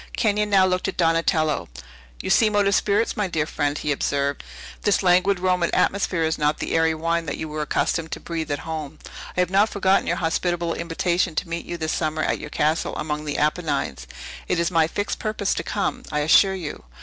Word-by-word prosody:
Kenyon 210 Hz, -2 st, +1 dB
now 195 Hz, -2 st, +5 dB
looked 185 Hz, 0 st, 0 dB
at 195 Hz, -, -4 dB
Donatello. 165 Hz, -, +1 dB, 0.5 s
"You -, -, -1 dB
seem 215 Hz, -2 st, +4 dB
out 205 Hz, -1 st, +3 dB
of 200 Hz, -, +2 dB
spirits, 210 Hz, +2 st, +1 dB
my 210 Hz, -2 st, 0 dB
dear 160 Hz, -4 st, -1 dB
friend," 145 Hz, -2 st, -1 dB
he 150 Hz, -, -2 dB
observed. 140 Hz, 0 st, -1 dB, 0.4 s
"This 205 Hz, -1 st, +2 dB
languid 185 Hz, +1 st, +3 dB
Roman 180 Hz, -2 st, +1 dB
atmosphere 185 Hz, -4 st, +1 dB
is 160 Hz, 0 st, 0 dB
not 150 Hz, 0 st, +1 dB
the -, -, -3 dB
airy 160 Hz, 0 st, +3 dB
wine 165 Hz, +1 st, -1 dB
that -, -, -3 dB
you 160 Hz, -, -4 dB
were 155 Hz, 0 st, -4 dB
accustomed 160 Hz, +2 st, -1 dB
to -, -, -5 dB
breathe 165 Hz, -2 st, -4 dB
at 145 Hz, -, 0 dB
home. 155 Hz, -2 st, -5 dB, 0.4 s
I -, -, +4 dB
have 180 Hz, 0 st, 0 dB
not 200 Hz, +3 st, +4 dB
forgotten 195 Hz, -1 st, +2 dB
your -, -, +1 dB
hospitable 170 Hz, 0 st, -1 dB
invitation 170 Hz, 0 st, -1 dB
to 170 Hz, -, -1 dB
meet 170 Hz, 0 st, -4 dB
you 175 Hz, -, -4 dB
this 160 Hz, -1 st, -2 dB
summer 155 Hz, -1 st, -1 dB
at -, -, 0 dB
your -, -, -7 dB
castle 155 Hz, +2 st, 0 dB
among 150 Hz, 0 st, -3 dB
the 145 Hz, -1 st, -3 dB
Apennines. 75 Hz, -, -1 dB, 0.4 s
It 180 Hz, -, 0 dB
is 170 Hz, +1 st, +1 dB
my 165 Hz, -2 st, +3 dB
fixed 205 Hz, +5 st, -3 dB
purpose 215 Hz, -2 st, -1 dB
to -, -, -2 dB
come, 205 Hz, -, -2 dB
I 150 Hz, -1 st, 0 dB
assure 190 Hz, +6 st, +5 dB
you. 165 Hz, -, -6 dB
165 Hz, 210 wpm, -23 LUFS, 155-190 Hz, 0.5 s, now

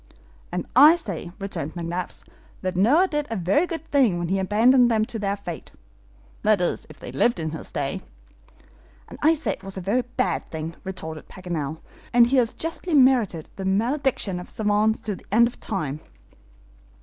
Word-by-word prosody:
"And -, -, -3 dB
I 300 Hz, +5 st, +9 dB
say," 195 Hz, -, -5 dB
returned 175 Hz, -6 st, -5 dB
McNabbs, 175 Hz, +1 st, -4 dB, 0.4 s
"that 185 Hz, 0 st, -2 dB
Noah 275 Hz, -, +4 dB
did 295 Hz, -3 st, -2 dB
a 225 Hz, -, -2 dB
very 195 Hz, -, +2 dB
good 325 Hz, -2 st, -5 dB
thing 255 Hz, -11 st, +3 dB
when 175 Hz, -1 st, -3 dB
he 195 Hz, +1 st, +1 dB
abandoned 235 Hz, +6 st, +4 dB
them 220 Hz, -2 st, +2 dB
to 225 Hz, -, -5 dB
their 200 Hz, 0 st, -1 dB
fate 175 Hz, -5 st, -7 dB, 0.7 s
that 215 Hz, -2 st, +3 dB
is, 175 Hz, -, -1 dB
if -, -, -14 dB
they -, -, -8 dB
lived 235 Hz, -6 st, +2 dB
in 160 Hz, -1 st, -2 dB
his 160 Hz, -, -7 dB
day." -, -, -3 dB, 1.1 s
"And -, -, -11 dB
I 315 Hz, +2 st, +5 dB
say 315 Hz, -, -2 dB
he 195 Hz, -, -11 dB
did 195 Hz, -, -5 dB
a -, -, -3 dB
very 205 Hz, +8 st, +1 dB
bad 245 Hz, -8 st, -2 dB
thing," 160 Hz, +1 st, -5 dB
retorted 160 Hz, -5 st, -7 dB
Paganel, 160 Hz, -5 st, -5 dB, 0.3 s
"and 240 Hz, -1 st, +7 dB
he 260 Hz, +3 st, +2 dB
has 235 Hz, -3 st, +3 dB
justly 330 Hz, +1 st, -2 dB
merited 245 Hz, -, +3 dB
the 195 Hz, -, -4 dB
malediction 225 Hz, -1 st, 0 dB
of 180 Hz, -, -9 dB
SAVANTS 215 Hz, 0 st, +1 dB
to 210 Hz, -2 st, -3 dB
the -, -, -17 dB
end 235 Hz, +3 st, +5 dB
of 240 Hz, -, -9 dB
time!" 155 Hz, -9 st, -3 dB
205 Hz, 185 wpm, -24 LUFS, 180-250 Hz, 1.1 s, I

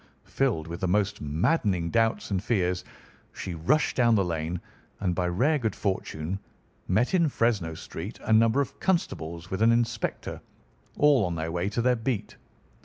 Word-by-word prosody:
Filled 120 Hz, -13 st, 0 dB
with 85 Hz, +1 st, -6 dB
the 95 Hz, -, +1 dB
most 105 Hz, +2 st, +1 dB
maddening 85 Hz, -, +1 dB
doubts 115 Hz, -2 st, +1 dB
and 95 Hz, -1 st, 0 dB
fears, 90 Hz, -6 st, 0 dB, 0.5 s
she 90 Hz, -, -5 dB
rushed 85 Hz, -, +1 dB
down 120 Hz, -3 st, +4 dB
the 100 Hz, -3 st, +2 dB
lane 85 Hz, 0 st, -2 dB, 0.4 s
and, 90 Hz, -3 st, 0 dB
by 90 Hz, 0 st, 0 dB
rare 135 Hz, -, +2 dB
good 110 Hz, -4 st, -1 dB
fortune, 95 Hz, -2 st, -2 dB, 0.5 s
met 110 Hz, -, +2 dB
in 170 Hz, -4 st, +4 dB
Fresno 105 Hz, -, 0 dB
Street 85 Hz, +6 st, -7 dB
a 110 Hz, -, +1 dB
number 115 Hz, +5 st, +5 dB
of 140 Hz, 0 st, -5 dB
constables 85 Hz, -, -1 dB
with 95 Hz, +2 st, -2 dB
an 115 Hz, +1 st, +6 dB
inspector, 115 Hz, -1 st, -1 dB, 0.6 s
all 145 Hz, -6 st, +5 dB
on 90 Hz, -2 st, -1 dB
their 80 Hz, 0 st, -3 dB
way 90 Hz, +3 st, -1 dB
to 115 Hz, +2 st, -1 dB
their 125 Hz, 0 st, +4 dB
beat. 115 Hz, -2 st, -3 dB
100 Hz, 170 wpm, -27 LUFS, 85-120 Hz, 0.6 s, an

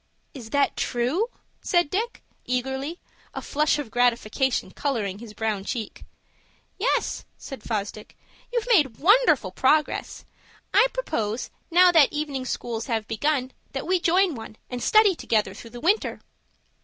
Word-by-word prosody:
"Is 240 Hz, -5 st, -9 dB
that 285 Hz, +2 st, +2 dB
true?" 255 Hz, -, 0 dB, 0.3 s
said 345 Hz, -4 st, +1 dB
Dick, 455 Hz, +5 st, -2 dB, 0.2 s
eagerly, 265 Hz, +6 st, -2 dB, 0.4 s
a -, -, -3 dB
flush 300 Hz, 0 st, +1 dB
of 280 Hz, -7 st, -5 dB
gratification 245 Hz, +1 st, +1 dB
coloring 215 Hz, -9 st, -2 dB
his 220 Hz, -2 st, -11 dB
brown 215 Hz, -3 st, -1 dB
cheek. 220 Hz, 0 st, -5 dB, 0.7 s
"Yes," -, -, 0 dB
said 270 Hz, -4 st, -9 dB
Fosdick. 210 Hz, -1 st, -5 dB, 0.3 s
"You've 475 Hz, -2 st, -1 dB
made 275 Hz, -, +3 dB
wonderful 320 Hz, -, +4 dB
progress. 295 Hz, +9 st, +1 dB, 0.5 s
I -, -, +6 dB
propose, 240 Hz, -, -2 dB, 0.2 s
now 355 Hz, +1 st, +6 dB
that 320 Hz, -5 st, +6 dB
evening 290 Hz, -3 st, -3 dB
schools 235 Hz, -2 st, -3 dB
have 225 Hz, -3 st, -1 dB
begun, 265 Hz, +2 st, 0 dB, 0.2 s
that 270 Hz, -, -3 dB
we 365 Hz, +1 st, +2 dB
join 355 Hz, +1 st, +3 dB
one, 225 Hz, -3 st, -9 dB, 0.2 s
and 245 Hz, -1 st, -4 dB
study 430 Hz, -, +5 dB
together 220 Hz, -8 st, 0 dB
through 230 Hz, -, -11 dB
the 240 Hz, +1 st, -9 dB
winter." 390 Hz, -, +1 dB
265 Hz, 140 wpm, -25 LUFS, 230-335 Hz, 0.7 s, I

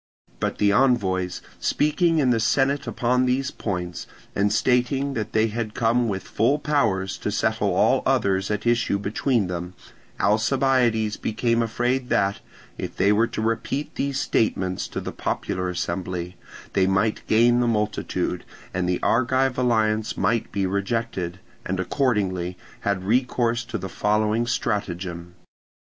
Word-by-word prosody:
Upon -, -, 0 dB
the 100 Hz, -1 st, +3 dB
envoys 95 Hz, -7 st, +1 dB, 0.2 s
speaking 165 Hz, +2 st, +2 dB
in 135 Hz, -5 st, +3 dB
the 115 Hz, -, +2 dB
senate 140 Hz, +5 st, +1 dB
upon 125 Hz, +1 st, +1 dB
these 130 Hz, +1 st, 0 dB
points, 90 Hz, -4 st, -4 dB, 0.3 s
and 100 Hz, +1 st, +2 dB
stating 130 Hz, +5 st, +1 dB
that 110 Hz, -4 st, -3 dB
they 110 Hz, +1 st, +3 dB
had 110 Hz, 0 st, -4 dB
come 120 Hz, +1 st, +2 dB
with 95 Hz, -3 st, -2 dB
full 125 Hz, +7 st, +1 dB
powers 110 Hz, -11 st, 0 dB
to -, -, -2 dB
settle -, -, 0 dB
all -, -, +3 dB
others 95 Hz, -1 st, +1 dB
at 105 Hz, +1 st, -2 dB
issue 120 Hz, -4 st, +2 dB
between 105 Hz, +3 st, 0 dB
them, 90 Hz, 0 st, -5 dB, 0.4 s
Alcibiades 115 Hz, 0 st, +2 dB
became 115 Hz, +1 st, 0 dB
afraid 125 Hz, +3 st, -1 dB
that, 100 Hz, 0 st, +1 dB, 0.4 s
if -, -, -5 dB
they 100 Hz, +2 st, +4 dB
were 115 Hz, +3 st, +3 dB
to 110 Hz, -, -4 dB
repeat 115 Hz, +6 st, -2 dB
these 140 Hz, -1 st, -1 dB
statements 95 Hz, -7 st, 0 dB
to -, -, -5 dB
the -, -, -5 dB
popular 90 Hz, 0 st, -2 dB
assembly, 90 Hz, 0 st, -3 dB, 0.4 s
they 95 Hz, -1 st, +3 dB
might 95 Hz, +3 st, +1 dB
gain 120 Hz, +2 st, +4 dB
the 120 Hz, -, +2 dB
multitude, 105 Hz, -2 st, -1 dB, 0.3 s
and 90 Hz, -1 st, -1 dB
the 90 Hz, -, 0 dB
Argive 130 Hz, +2 st, +2 dB
alliance 110 Hz, -3 st, +1 dB
might 115 Hz, -1 st, 0 dB
be 100 Hz, -1 st, 0 dB
rejected, 100 Hz, -2 st, -2 dB, 0.2 s
and 95 Hz, 0 st, -3 dB
accordingly 95 Hz, -6 st, 0 dB, 0.2 s
had 100 Hz, -2 st, -1 dB
recourse 120 Hz, +2 st, +1 dB
to 120 Hz, -1 st, -4 dB
the 95 Hz, -2 st, -5 dB
following 105 Hz, +4 st, +1 dB
stratagem. 90 Hz, -6 st, -3 dB
110 Hz, 145 wpm, -24 LUFS, 95-125 Hz, 0.4 s, they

